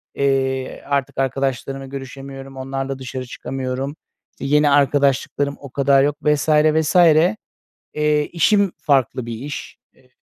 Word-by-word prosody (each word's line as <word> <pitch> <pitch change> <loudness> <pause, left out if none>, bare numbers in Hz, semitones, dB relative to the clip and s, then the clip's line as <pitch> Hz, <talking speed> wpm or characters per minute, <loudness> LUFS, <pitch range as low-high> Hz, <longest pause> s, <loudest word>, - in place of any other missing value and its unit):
eee, 135 -1 0
artık 140 -1 -1
arkadaşlarımla 135 0 -2
görüşemiyorum, 135 0 -9
onlarla 135 0 -4
dışarı 130 0 -6
çıkamıyorum. 130 +2 -4 0.4
Yeni 150 +2 +3
arkadaşlıklarım 140 0 +2
o 140 - -10
kadar 135 +1 +3
yok 145 0 +1
vs. 150 +1 +1
vs. 155 +1 +3 1.0
Eee, 150 -1 +1
işim 200 +3 +2
farklı 130 -4 +1
bir 120 - -5
iş. 145 +4 -7 0.2
Eee 125 - -27
135 Hz, 115 wpm, -20 LUFS, 135-145 Hz, 1.0 s, Yeni